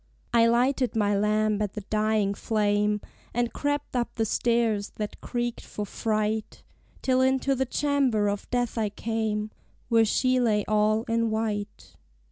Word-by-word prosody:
I 230 Hz, -1 st, +5 dB
lighted 250 Hz, +2 st, +2 dB
my 205 Hz, -2 st, +2 dB
lamp 215 Hz, +1 st, +1 dB
at 205 Hz, -2 st, -2 dB
the 210 Hz, -, -5 dB
dying 215 Hz, 0 st, +1 dB
flame, 210 Hz, -1 st, +1 dB, 0.3 s
And 240 Hz, -1 st, 0 dB
crept 290 Hz, -1 st, -2 dB
up 240 Hz, -1 st, -1 dB
the 225 Hz, -, 0 dB
stairs 225 Hz, -2 st, 0 dB
that 210 Hz, -1 st, -5 dB
creaked 240 Hz, -1 st, -3 dB
for 210 Hz, -, -5 dB
fright, 215 Hz, 0 st, -2 dB, 0.4 s
Till 260 Hz, -1 st, +3 dB
into 265 Hz, +1 st, +2 dB
the 265 Hz, 0 st, -1 dB
chamber 265 Hz, -7 st, +1 dB
of 205 Hz, 0 st, -3 dB
death 245 Hz, -2 st, -1 dB
I 215 Hz, -2 st, +1 dB
came, 215 Hz, 0 st, -2 dB, 0.4 s
Where 225 Hz, -1 st, +5 dB
she 255 Hz, +4 st, +2 dB
lay 215 Hz, -4 st, +2 dB
all 215 Hz, +1 st, +2 dB
in 230 Hz, -1 st, 0 dB
white. 215 Hz, -2 st, -3 dB
220 Hz, 150 wpm, -26 LUFS, 210-240 Hz, 0.4 s, I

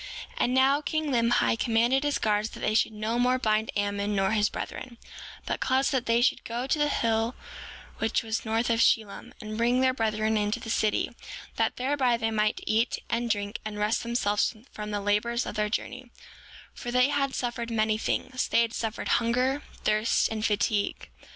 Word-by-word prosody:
7:16 -, -, -19 dB
And 250 Hz, -, +2 dB
now, 270 Hz, +2 st, +4 dB
king 310 Hz, +1 st, -1 dB
Limhi 235 Hz, -2 st, +2 dB
commanded 240 Hz, +4 st, +2 dB
his 290 Hz, -1 st, +1 dB
guards 210 Hz, 0 st, 0 dB
that -, -, -11 dB
they 215 Hz, -, 0 dB
should 220 Hz, -, +2 dB
no 220 Hz, +2 st, -2 dB
more 250 Hz, +1 st, +3 dB
bind 220 Hz, -2 st, +1 dB
Ammon 205 Hz, 0 st, -1 dB
nor 195 Hz, 0 st, +1 dB
his 210 Hz, -1 st, +2 dB
brethren, 240 Hz, -2 st, -7 dB, 0.5 s
but -, -, -2 dB
caused 260 Hz, +2 st, +1 dB
that 260 Hz, -3 st, -1 dB
they 230 Hz, +1 st, +3 dB
should -, -, +2 dB
go 235 Hz, +2 st, -3 dB
to 285 Hz, +3 st, 0 dB
the 295 Hz, 0 st, +2 dB
hill 225 Hz, -1 st, 0 dB, 0.6 s
which 225 Hz, +1 st, 0 dB
was 220 Hz, 0 st, -2 dB
north 225 Hz, +2 st, 0 dB
of 230 Hz, -, +1 dB
Shilom, 220 Hz, -3 st, +1 dB
and 215 Hz, +1 st, -6 dB
bring 240 Hz, +2 st, +3 dB
their 260 Hz, 0 st, +3 dB
brethren 220 Hz, -2 st, 0 dB
into 210 Hz, 0 st, 0 dB
the 225 Hz, -, -5 dB
city, 215 Hz, -2 st, +1 dB, 0.5 s
that -, -, 0 dB
thereby 255 Hz, -2 st, +1 dB
they 225 Hz, -1 st, -1 dB
might 215 Hz, -1 st, 0 dB
eat, 225 Hz, +2 st, +1 dB
and 235 Hz, 0 st, 0 dB
drink, 205 Hz, -1 st, -2 dB
and 215 Hz, -1 st, -6 dB
rest 210 Hz, +2 st, +1 dB
themselves 230 Hz, -2 st, 0 dB, 0.2 s
from 210 Hz, 0 st, -6 dB
the 205 Hz, -1 st, -2 dB
labors 210 Hz, +4 st, 0 dB
of -, -, -5 dB
their 210 Hz, 0 st, 0 dB
journey; 250 Hz, +3 st, -4 dB, 0.6 s
for 245 Hz, -, -7 dB
they 250 Hz, +2 st, +3 dB
had 275 Hz, -2 st, 0 dB
suffered 240 Hz, -1 st, -3 dB
many 215 Hz, -1 st, +1 dB
things; 255 Hz, +2 st, -1 dB
they 235 Hz, -, +3 dB
had 230 Hz, 0 st, -3 dB
suffered 225 Hz, -1 st, -3 dB
hunger, 250 Hz, +4 st, +1 dB, 0.2 s
thirst, 215 Hz, +2 st, +2 dB
and 220 Hz, -1 st, -3 dB
fatigue. 210 Hz, -1 st, 0 dB
230 Hz, 190 wpm, -27 LUFS, 215-250 Hz, 0.6 s, now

